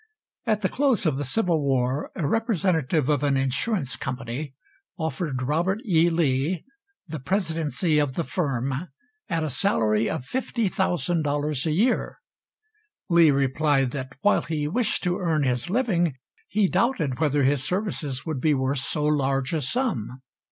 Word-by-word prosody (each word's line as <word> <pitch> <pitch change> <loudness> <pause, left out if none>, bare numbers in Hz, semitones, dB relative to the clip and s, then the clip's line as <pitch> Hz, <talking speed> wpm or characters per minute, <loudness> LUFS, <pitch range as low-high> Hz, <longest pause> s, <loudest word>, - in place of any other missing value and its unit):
At 215 -2 +1
the 190 - +2
close 270 -7 +1
of 150 -5 +1
the 145 - -2
Civil 170 - +1
War 135 0 0
a 160 -6 -1
representative 175 - +1
of 145 -3 +2
an 140 -2 +2
insurance 135 - 0
company 130 +2 -5 0.4
offered 160 -5 -2
Robert 170 +9 0
E. 170 -4 +4
Lee 160 0 0 0.4
the 160 -3 -6
presidency 165 -1 0
of 140 -3 0
the 170 - 0
firm 140 -1 -2 0.4
at 165 -3 0
a - - -1
salary 110 - +1
of 125 - -3
$50,000 155 - 0
a - - +1
year. 220 +11 +1 0.9
Lee 170 -2 +7
replied 135 -1 +2
that 130 -2 -5
while 205 - +4
he 150 -3 -2
wished 225 +8 0
to 180 +1 0
earn 160 -5 +1
his 125 +3 -1
living, 180 - +1 0.3
he 205 -1 +2
doubted 180 - 0
whether 145 -2 +2
his 135 0 +2
services 155 -7 -2
would 155 -6 -3
be 150 0 +3
worth 130 +1 0
so 150 +3 -2
large 135 -2 +1
a 160 - 0
sum. 130 - -2
150 Hz, 150 wpm, -25 LUFS, 135-180 Hz, 0.9 s, Lee